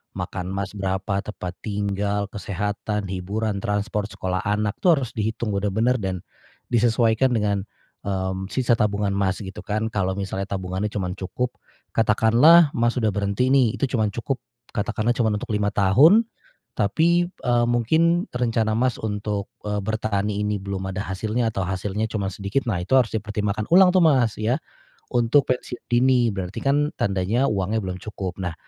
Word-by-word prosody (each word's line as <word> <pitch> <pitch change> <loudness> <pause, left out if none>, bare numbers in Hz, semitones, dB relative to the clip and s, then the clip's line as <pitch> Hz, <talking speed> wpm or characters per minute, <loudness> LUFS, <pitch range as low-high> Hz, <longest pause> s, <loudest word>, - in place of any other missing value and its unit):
makan 90 0 -4
Mas, 95 0 -3
berapa 95 0 -2
tempat 90 -3 -6
tinggal, 100 -1 -2
kesehatan, 105 +1 -3
hiburan, 100 +3 -2
transport, 105 +1 -1
sekolah 95 -3 -3
anak 105 0 -1
tuh 175 -3 +5
harus 130 -4 -3
dihitung 110 0 -2
benar-benar 110 +5 +1
dan 95 -3 -3 0.5
disesuaikan 120 +1 +3
dengan, 100 -2 0 0.4
mmm, 95 0 -2
sisa 120 +1 +1
tabungan, 100 -2 +1
Mas, 100 +1 -1
gitu 95 +3 -8
kan 110 +2 -2
kalau 95 -2 -1
misalnya 95 0 -3
tabungannya 95 +1 -3
cuman 95 -3 -4
cukup 125 +6 -2 0.4
katakanlah 120 +9 +5
Mas 120 +1 +1
sudah 110 -4 +1
berhenti 100 +6 0
nih 130 -5 +4
itu 140 - -1
cuman 110 -2 +2
cukup 125 +4 -3 0.3
katakanlah 110 +1 -1
cuman 110 -3 +1
untuk 105 - -5
5 105 -1 +1
tahun, 130 - +5 0.6
tapi, 170 - +3
eee, 120 -9 0
mungkin 160 - +2
rencana 115 -3 0
Mas 125 0 +1
untuk, 105 -1 -3 0.2
eee, 105 0 -1
bertani 105 -1 -1
ini 105 - 0
belum 95 -1 -4
ada 100 - -2
hasilnya 110 +5 -1
atau 95 -4 -2
hasilnya 100 +3 -2
cuman 100 -3 -3
sedikit. 100 +8 -2
Nah, 95 -6 0
itu 130 - +1
harus 125 -4 +4
dipertimbangkan 105 0 -2
ulang 185 0 +7
tuh, 185 - +4
Mas, 130 -9 +3
ya, 115 +4 +1 0.5
untuk 120 +4 +3
pensiun 125 -1 -3
dini. 120 -1 +4
Berarti 90 -2 -5
kan 145 +2 +2
tandanya 100 +7 +1
uangnya 100 +2 0
belum 95 -1 -4
cukup 100 -4 -5
nah, 90 -2 -3
105 Hz, 155 wpm, -23 LUFS, 100-120 Hz, 0.6 s, ulang